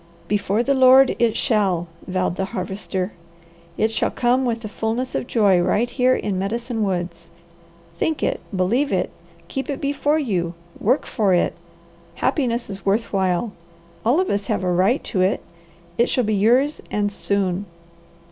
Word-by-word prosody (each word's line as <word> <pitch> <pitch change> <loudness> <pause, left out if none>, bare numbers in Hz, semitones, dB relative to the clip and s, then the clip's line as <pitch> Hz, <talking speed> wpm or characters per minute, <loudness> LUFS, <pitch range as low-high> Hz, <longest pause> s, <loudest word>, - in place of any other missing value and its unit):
"Before 205 +2 +1
the 275 - +2
Lord 260 0 +6
it 230 -1 +2
shall!" 190 -6 +1 0.2
vowed 185 -1 -1
the 190 - -1
Harvester. 190 +1 -3 0.7
"It 220 +1 +2
shall 225 - 0
come 250 +2 +1
with 230 -2 -1
the 220 - -5
fulness 225 +4 -2
of - - -2
joy 200 -6 +3
right 210 +6 +1
here 255 0 +3
in 195 -3 -2
Medicine 230 +4 -2
Woods. 175 -3 -3 0.7
Think 320 -2 0
it! - - 0 0.2
Believe 235 +10 +1
it! 180 -1 0 0.4
Keep 270 +8 -4
it 280 - -2
before 285 +2 +1
you! 180 - -1 0.2
Work 250 +7 +2
for 200 -6 +2
it! 175 - +1 0.6
Happiness 240 -5 0
is 195 -1 -7
worth 210 +4 0
while! 190 +3 0 0.5
All 245 +9 +3
of 375 - +1
us 200 -1 -1
have - - -1
a 180 - +1
right 195 +9 +2
to 190 - -1
it! 185 +2 +1 0.6
It 235 - +4
shall 250 - +1
be 215 0 0
yours 245 +9 +3
and 205 -1 -1
soon." 200 -1 -1
215 Hz, 165 wpm, -22 LUFS, 190-250 Hz, 0.7 s, Lord